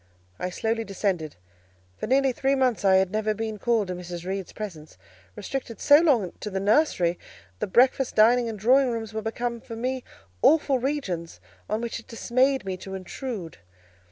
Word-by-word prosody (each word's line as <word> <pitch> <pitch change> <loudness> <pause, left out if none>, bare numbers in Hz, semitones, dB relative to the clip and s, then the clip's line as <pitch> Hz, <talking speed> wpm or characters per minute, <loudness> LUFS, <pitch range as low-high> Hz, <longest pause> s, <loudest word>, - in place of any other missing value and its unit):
I 180 - -2
slowly 225 +5 -1
descended. 190 -6 -2 0.6
For - - -5
nearly 270 +2 +3
three 270 +2 +1
months, 255 -5 +1
I 190 -1 +5
had 190 -1 +3
never 215 0 0
been 220 -1 -4
called 225 -3 +1
to - - -1
Mrs. 175 -1 -7
Reed's 190 0 -4
presence; 160 - -8 0.4
restricted 255 -4 -5
so 290 0 +7
long 250 - +2
to 210 - -5
the 190 -1 -2
nursery, 195 - +2 0.4
the - - -1
breakfast, 255 +5 +3
dining, 235 +2 +5
and 220 - -5
drawing 255 +6 +4
rooms 225 -2 -4
were 220 - -2
become 235 +2 -3
for 230 - -8
me 255 +2 -2 0.4
awful 290 -4 +4
regions, 190 - -3 0.3
on 215 - -1
which 235 -1 -4
it 230 - -16
dismayed 255 +2 +1
me 190 -1 -3
to 190 +1 -7
intrude. 190 - -6
225 Hz, 175 wpm, -26 LUFS, 190-255 Hz, 0.6 s, so